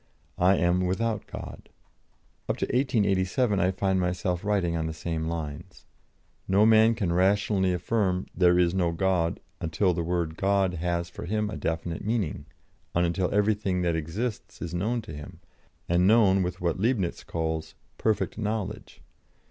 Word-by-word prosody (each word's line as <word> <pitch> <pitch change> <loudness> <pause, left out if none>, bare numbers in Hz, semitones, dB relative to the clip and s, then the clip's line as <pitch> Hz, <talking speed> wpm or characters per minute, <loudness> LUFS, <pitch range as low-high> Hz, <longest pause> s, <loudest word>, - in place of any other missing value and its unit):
I 90 +2 +5
am 90 +1 +2
without 110 +3 -1
God." - - -9 0.8
Up - - 0
to - - 0
1887 105 -3 +1
I 95 -1 +3
find 95 0 0
myself 90 0 -1
writing 100 -5 +1
on 80 -1 -1
the 80 - -5
same 80 0 -3
lines: 80 -3 -6 0.6
"No 100 +3 +4
man 110 +1 +6
can 95 -7 -1
rationally 95 +1 +2
affirm 90 +1 0
'There 90 -1 +4
is 90 -1 +3
no 90 -3 +1
God,' 90 -2 0 0.2
until 85 +3 +1
the 85 - -2
word 85 -1 -2
'God' 95 -1 +2
has 85 0 -2
for - - -7
him 105 +2 -1
a - - -4
definite 80 +1 -3
meaning, 100 -10 -2 0.5
and 85 0 +3
until 85 +2 0
everything 100 -3 +1
that 85 -1 +1
exists 100 +9 -4
is 85 - -5
known 110 +7 -1
to 80 - -9
him, 75 0 -9 0.5
and 90 +2 +3
known 100 -3 +5
with 90 0 -3
what 85 0 -1
Leibnitz 105 -5 0
calls 80 -1 -3 0.2
'perfect 110 +1 0
knowledge.' 105 -1 -4
90 Hz, 155 wpm, -27 LUFS, 85-105 Hz, 0.8 s, man